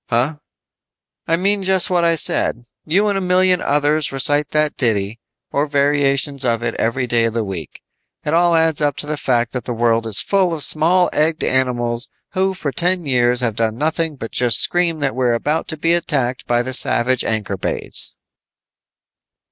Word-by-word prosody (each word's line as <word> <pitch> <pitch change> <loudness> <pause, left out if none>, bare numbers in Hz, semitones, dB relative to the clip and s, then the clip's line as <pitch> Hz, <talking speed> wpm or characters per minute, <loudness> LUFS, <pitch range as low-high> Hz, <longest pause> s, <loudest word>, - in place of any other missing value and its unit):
"Huh?" 130 +6 0 0.9
"I 165 - +2
mean 200 +3 +1
just 190 +1 0
what 175 -1 +2
I 170 0 +3
said. 120 -5 +1 0.2
You 195 +7 +1
and 200 -1 0
a - - -5
million 180 0 +2
others 145 +1 0
recite 145 +2 +2
that 150 -1 0
ditty, 110 -2 -1 0.3
or 145 +2 0
variations 140 -1 +1
of 120 -2 0
it 115 -1 -1
every 120 +3 0
day 120 -1 +1
of 115 0 -3
the 115 - 0
week. 95 -5 -7 0.4
It 150 - -1
all 170 0 +3
adds 160 -2 +1
up 145 -2 +1
to - - 0
the 150 +1 -2
fact 120 -4 -1
that 125 -3 -5
the 120 - -4
world 115 -1 +1
is 110 -2 0
full 190 -4 +1
of 150 - 0
small 175 +4 +3
egged 155 +1 0
animals 120 -2 0 0.2
who 190 0 -1
for 150 -6 -4
ten 180 +2 0
years 125 -2 +1
have 115 -4 -1
done 110 0 -1
nothing 160 +2 -1
but 115 -4 -8
just 120 -3 +2
scream 170 -3 +1
that 135 -2 0
we're 125 -2 +1
about 150 +7 -2
to 155 - -5
be 165 +2 +1
attacked 135 -7 -1
by 120 0 +1
the 130 +1 -4
savage 130 0 +2
Ankorbades." 105 -4 -3
145 Hz, 185 wpm, -18 LUFS, 120-165 Hz, 0.9 s, I